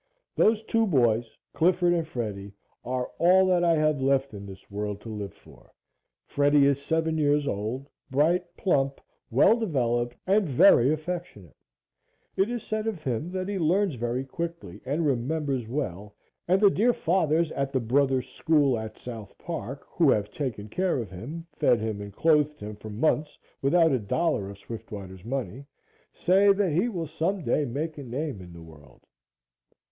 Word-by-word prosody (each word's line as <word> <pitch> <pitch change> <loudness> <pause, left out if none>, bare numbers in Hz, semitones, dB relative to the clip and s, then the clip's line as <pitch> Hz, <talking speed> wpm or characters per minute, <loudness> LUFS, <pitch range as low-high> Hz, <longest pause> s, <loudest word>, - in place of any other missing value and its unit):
Those 220 0 +3
two 225 0 +1
boys 120 - +1 0.2
Clifford 175 +1 +3
and 165 -2 -1
Freddie 100 -7 -5 0.3
are 125 +1 -3
all 185 +2 +5
that 180 -2 +2
I 170 -1 +4
have 155 -2 +1
left 135 -1 +1
in 100 -1 -8
this 95 +1 -13
world 105 0 -3
to 115 - -9
live 105 -2 -5
for. - - -19 0.5
Freddie 145 0 +3
is 140 0 +2
seven 160 +1 0
years 145 -1 +2
old, 115 +4 -3 0.2
bright, 155 +7 +1
plump, 140 -7 +1 0.3
well 130 - +5
developed 120 - -1
and 195 -2 +2
very 130 0 +6
affectionate. 155 - -5 0.8
It 195 +3 +2
is 240 -2 -4
said 215 0 -3
of 195 -8 -4
him 135 +6 -2
that 185 0 -2
he 200 -1 -2
learns 180 +3 +2
very 120 +2 -2
quickly 170 +4 -6
and 155 +4 0
remembers 135 -1 -1
well, 105 -6 -4 0.3
and 185 +2 +3
the 200 -1 +6
dear 240 +6 +3
Fathers 165 -4 +1
at 140 0 -2
the 130 - +1
Brothers 130 +2 +1
School 140 -2 +2
at 110 0 -7
South 115 -5 -9
Park, 145 -5 -6
who 165 -5 +3
have 105 -5 +1
taken 120 -8 -4
care 180 - 0
of 115 -6 -5
him, 145 - -7
fed 120 -5 +3
him 110 -2 -3
and 100 0 -7
clothed 150 +4 +2
him 105 0 -7
for 110 +1 -10
months 150 +7 0 0.2
without 165 +4 +4
a 130 - +2
dollar 105 -1 -1
of 100 - -10
Swiftwater's 100 -4 -9
money, 130 +1 -4 0.5
say 195 +3 +4
that 195 -3 0
he 180 +11 +1
will 175 -7 -3
some 165 +4 -2
day 145 +4 +1
make 150 +5 -4
a - - -6
name 130 -3 -4
in 90 -1 -11
the 85 -1 -11
world. 75 -5 -17
140 Hz, 170 wpm, -27 LUFS, 115-170 Hz, 0.8 s, very